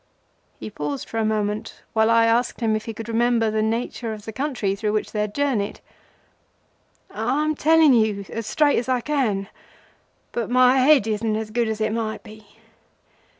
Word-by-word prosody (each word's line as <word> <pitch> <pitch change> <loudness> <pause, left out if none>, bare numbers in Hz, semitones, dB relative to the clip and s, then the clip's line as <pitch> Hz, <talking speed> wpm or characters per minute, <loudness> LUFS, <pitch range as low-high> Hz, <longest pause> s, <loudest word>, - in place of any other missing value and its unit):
He 110 -1 -7
paused 145 -2 -4
for 225 - -4
a - - +1
moment, 215 -1 -2
while 220 0 +3
I 230 0 +5
asked 235 +2 +1
him 225 -3 +1
if 215 - -4
he 225 - -5
could 225 +1 -7
remember 230 -1 +1
the 215 0 0
nature 225 +1 -2
of 210 -1 -10
the 220 - -7
country 255 -7 -2
through 210 +1 -2
which 215 - -2
he 210 - -3
had 210 0 -2
journeyed. 255 -8 -1 1.3
"I 250 +7 -1
am 310 0 0
telling 315 -1 +4
you 215 -4 +1
as 230 -1 -5
straight 300 +2 +2
as 245 - -5
I 250 -1 +1
can, 230 -9 -1 0.8
but 235 -2 -3
my 255 +1 +5
head 270 -3 +5
isn't 215 0 -1
as 215 0 -4
good 235 +1 0
as 220 -1 -3
it 215 0 0
might 225 -1 -3
be. 215 -1 -14
225 Hz, 190 wpm, -23 LUFS, 215-245 Hz, 1.3 s, I